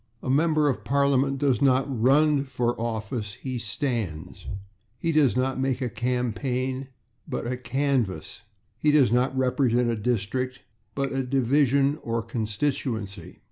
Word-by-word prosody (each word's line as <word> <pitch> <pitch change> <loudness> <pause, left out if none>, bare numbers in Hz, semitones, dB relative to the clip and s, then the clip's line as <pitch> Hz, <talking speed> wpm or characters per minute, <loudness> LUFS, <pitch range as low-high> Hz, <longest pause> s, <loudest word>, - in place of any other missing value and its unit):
A 130 - 0
member 155 +1 +3
of 135 - -1
Parliament 140 0 +2
does 135 -1 +1
not 135 -1 +3
/run/ 140 +3 +3
for 120 -2 0
office; 110 -2 -3
he 130 -2 -5
/stands/. 110 - -3 0.5
He 165 +8 -1
does 145 -7 +3
not 130 +1 0
make 130 -1 0
a 125 -4 -2
/campaign/, 125 +2 -1 0.4
but - - -3
a 125 +1 -1
/canvass/. 125 - -1 0.4
He 150 - +2
does 145 -6 +5
not 125 +2 +2
represent 125 -2 +2
a - - 0
/district/, 125 +3 -1 0.4
but 140 -1 -1
a 135 - 0
/division/ 135 +2 +2
or 115 -1 -2
/constituency 110 - -3
130 Hz, 140 wpm, -26 LUFS, 115-140 Hz, 0.5 s, does